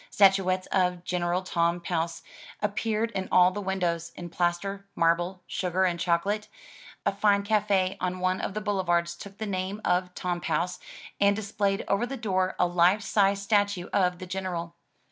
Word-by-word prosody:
Statuettes 190 -2 +4
of 180 -2 +1
General 180 +1 -1
Tom 170 -1 +1
Pouce 165 -1 -2 0.4
appeared 215 +2 -1
in 190 -3 -4
all 180 0 +6
the 205 +2 -4
windows, 175 -3 -1
in 175 -1 -8
plaster, 185 +3 -1
marble, 175 +2 +1
sugar 185 0 -1
and 175 -2 0
choco 170 +2 +1
late. 210 +1 -2 0.6
A - - +3
fine 200 0 +2
cafe 200 -2 +1
on 185 0 -1
one 185 0 0
of 195 - -4
the 215 - -2
boulevards 175 -4 0
took 195 +3 -11
the 220 - -4
name 190 0 -3
of 180 0 +1
"Tom 175 -1 -2
Pouce*' 180 0 -1 0.4
and 200 0 +4
displayed 200 -1 -1
over 200 +5 +1
the 270 +2 -5
door 185 -5 0
a - - +3
life 180 +4 +3
size 200 -1 +2
statue 205 -3 +1
of 180 -2 +2
the 185 - -7
General. 175 -2 -4
185 Hz, 170 wpm, -27 LUFS, 175-200 Hz, 0.6 s, all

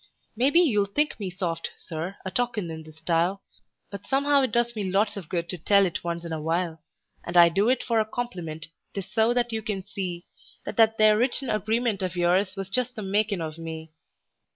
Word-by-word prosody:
Maybe 270 +8 +4
you'll 215 - +3
think 295 +9 0
me 195 -3 -3
soft, 175 -2 -3
Sir, 170 +4 -6
a 190 - -3
talkin' 215 -6 -1
in 160 0 -6
this 155 0 -14
style, 170 +4 0 0.5
But 200 -1 -8
somehow 280 +1 +3
it 260 -4 0
does 235 0 +1
me 200 -3 -2
lots 205 +3 +2
of 190 -6 -7
good 170 -1 -2
to 180 - -5
tell 200 +4 +4
it 175 - -3
once 170 0 -3
in 165 - -4
a 155 - -3
while; 165 0 -1 0.4
And 175 +1 -2
I 170 -1 +9
do 195 +7 +2
it 260 - +2
for 230 -2 +1
a 215 - +2
compliment 175 -10 -5 0.3
'tis 195 -2 -3
so 220 +2 +4
that 240 -1 0
you 220 - -1
can 205 -3 -3
see 185 -3 -5 0.4
That - - -6
that 225 -1 +5
there 215 0 +5
written 255 +1 0
agreement 220 0 0
of 185 -1 -2
yours 185 +3 +2
was 195 -1 -4
just 250 +5 0
the 215 - -5
makin' 200 -1 0
of 160 0 -5
me. 160 -1 -7
195 Hz, 215 wpm, -26 LUFS, 170-225 Hz, 0.5 s, I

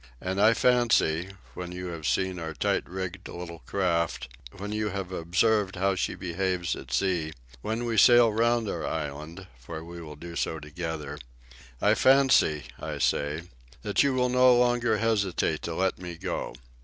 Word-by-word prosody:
And 95 +2 -2
I 110 +2 +6
fancy, 115 -9 +3 0.2
when 90 -1 -6
you 90 0 -6
have 80 -3 -5
seen 95 -1 0
our 80 -2 -5
tight 70 - 0
rigged 95 0 -5
little 85 -1 -8
craft, 85 -4 0 0.2
when 100 +2 -6
you 105 0 -1
have 95 -1 -5
observed 95 +4 +1
how 95 +1 +1
she 90 - -2
behaves 90 0 -2
at 65 - -10
sea, 80 +2 0 0.3
when 115 +3 -2
we 115 -2 -1
sail 120 +1 +7
round 115 0 +2
our - - -3
island, 75 +4 -5
for 80 +6 -8
we 85 +1 -9
will 75 -2 -9
do 85 +3 -9
so 80 - -1
together 75 -1 -6 0.6
I - - +4
fancy, 130 - +4 0.2
I - - -5
say, 75 +3 0 0.4
that - - +2
you 140 -2 +2
will 125 -1 +2
no 125 0 +5
longer 120 -2 +2
hesitate 105 -5 0
to 85 - -4
let 95 0 0
me 90 -1 -6
go. - - -4
90 Hz, 170 wpm, -27 LUFS, 85-110 Hz, 0.6 s, sail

